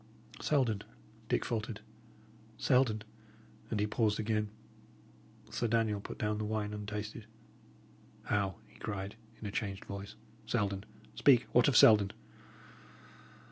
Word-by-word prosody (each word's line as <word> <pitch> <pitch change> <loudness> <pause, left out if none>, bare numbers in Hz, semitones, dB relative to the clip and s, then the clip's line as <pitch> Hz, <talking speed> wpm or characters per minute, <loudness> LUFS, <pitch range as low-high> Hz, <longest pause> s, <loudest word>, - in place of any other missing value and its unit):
"Selden," 125 -9 +2 0.5
Dick - - +1
faltered 110 -1 -2 0.8
"Selden" 125 -5 +3 0.7
And 110 - -1
he 105 - +3
paused 105 0 +1
again. 105 -1 0 1.0
Sir 120 - 0
Daniel 110 -2 +1
put - - -7
down 105 0 -1
the - - -1
wine 105 -1 -2
untasted. 105 +1 -5 1.0
"How!" 100 -2 0
he - - -20
cried, 100 0 -4 0.2
in - - -8
a 100 - -3
changed 100 -1 -3
voice. 100 +1 -7 0.3
"Selden? 100 -4 0 0.3
Speak! 130 -4 +5
What 125 +2 +5
of 140 - +4
Selden?" 105 -3 +7
105 Hz, 120 wpm, -33 LUFS, 105-115 Hz, 1.0 s, Selden